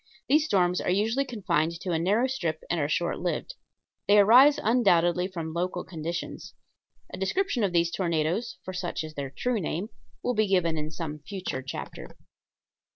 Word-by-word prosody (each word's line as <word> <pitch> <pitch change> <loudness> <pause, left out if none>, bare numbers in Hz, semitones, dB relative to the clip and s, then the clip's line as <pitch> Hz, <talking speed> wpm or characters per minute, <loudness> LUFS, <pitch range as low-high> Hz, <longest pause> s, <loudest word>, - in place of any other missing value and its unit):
These 300 +2 +4
storms 180 - +2
are - - -2
usually 220 +8 +1
confined 170 - -1
to 180 - -4
a 165 - +1
narrow 205 +9 +2
strip 170 -12 -2
and 170 - +1
are 145 -1 0
short 170 +2 0
lived. 180 - -3 0.5
They 205 - +6
arise 250 +8 +7
undoubtedly 180 -6 +3
from 165 -4 -6
local 180 +1 -2
conditions. 170 0 -6 0.6
A - - -6
description 245 - 0
of 195 - +1
these 170 -1 +2
tornadoes 170 +4 -1
for 185 - -5
such 180 -3 -3
is 155 0 -8
their 140 -2 -4
true 235 - -1
name 180 +4 -3 0.3
will 250 - 0
be 215 -2 +2
given 180 -4 +2
in 155 -1 -3
some 155 -1 -6
future 180 -4 -5
chapter.) 130 - -8
180 Hz, 170 wpm, -27 LUFS, 165-210 Hz, 0.6 s, arise